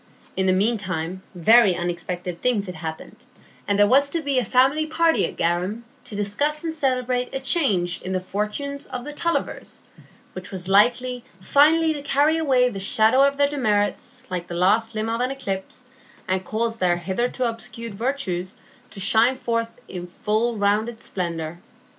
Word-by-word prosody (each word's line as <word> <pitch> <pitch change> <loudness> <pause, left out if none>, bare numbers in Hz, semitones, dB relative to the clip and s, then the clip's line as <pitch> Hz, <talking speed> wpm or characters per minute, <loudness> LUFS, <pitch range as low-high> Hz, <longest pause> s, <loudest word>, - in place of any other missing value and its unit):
In 190 0 0
the - - +4
mean 210 +5 +2
time 185 -1 -4
very 205 +2 +5
unexpected 175 0 -4
things 235 -5 +1
had 180 - -6
happened, 160 -1 -7 0.5
and 205 - +1
there 205 - +6
was 275 +6 +4
to 330 +2 -3
be 280 -3 +1
a - - 0
family 270 +8 +2
party 330 +1 +2
at - - -9
Garum 180 +7 -1 0.2
to 240 -4 -8
discuss 285 +10 -1
and 325 -1 -2
celebrate 255 -4 -1
a - - -1
change 245 - 0
in 185 - -5
the 185 - 0
fortunes 210 +10 -4
of 250 -1 -6
the 295 - -6
Tullivers, 335 +3 -3 0.5
which 185 0 -8
was 185 -2 -5
likely 245 +5 +3 0.2
finally 315 - +4
to 290 - -6
carry 290 +3 +2
away 260 -5 +3
the 210 -6 -4
shadow 220 +6 +3
of 280 0 +3
their 285 0 +4
demerits 215 -8 -1
like 180 -1 -3
the 175 - -6
last 215 +6 +2
limb 215 +1 -1
of 230 +1 -1
an 250 - +1
eclipse, 250 -3 -5 0.4
and 185 0 0
cause 225 +3 -2
their 175 -3 +2
hitherto 200 +9 -2
obscured 230 0 -6
virtues 195 -6 -3 0.3
to 200 - -8
shine 225 +6 +4
forth 230 -2 -1 0.2
in 180 -1 -7 0.2
full 220 +2 +1
rounded 215 +3 0
splendor. 170 -2 -4
225 Hz, 170 wpm, -23 LUFS, 185-265 Hz, 0.5 s, there